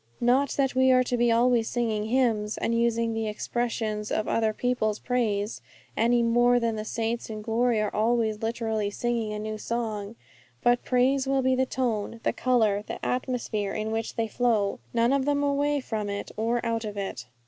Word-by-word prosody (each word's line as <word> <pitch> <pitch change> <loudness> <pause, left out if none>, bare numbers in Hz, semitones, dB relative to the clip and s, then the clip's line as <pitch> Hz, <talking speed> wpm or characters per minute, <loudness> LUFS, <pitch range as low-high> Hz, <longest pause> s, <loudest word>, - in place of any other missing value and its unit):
Not 255 +3 +3
that 270 -2 +2
we 260 +1 +4
are 255 0 +5
to 245 - -1
be 240 -1 +3
always 235 0 +3
singing 225 -3 -1
hymns, 220 -3 +1
and 230 - -1
using 230 0 +1
the 225 0 -2
expressions 215 -1 -2
of 215 - 0
other 220 -1 +1
people's 215 -2 0
praise, 215 -4 -1 0.3
any 235 +1 +3
more 240 +1 +4
than 230 -1 0
the 215 - -4
saints 230 +1 -3
in 215 -1 -6
glory 230 +1 +1
are 210 -1 -1
always 220 -1 +1
literally 225 -2 -1
singing 230 0 -2
a 210 - -3
new 215 0 -4
song. 220 -2 -3 0.5
But 245 0 +3
praise 265 +2 +2
will 270 -1 +1
be 260 0 +3
the 260 0 +1
tone, 230 -4 -2
the - - +1
colour, 220 -5 +2
the - - -6
atmosphere 240 -5 -2
in 215 0 -2
which 225 0 -3
they 230 -1 0
flow; 220 -3 +1
none 235 +2 +2
of 275 -1 +1
them 285 0 +1
away 285 +1 +1
from 215 -5 -3
it 200 0 -4
or 235 +2 -1
out 230 0 -1
of 210 -1 -6
it. 160 -11 -5
230 Hz, 190 wpm, -27 LUFS, 215-245 Hz, 0.5 s, are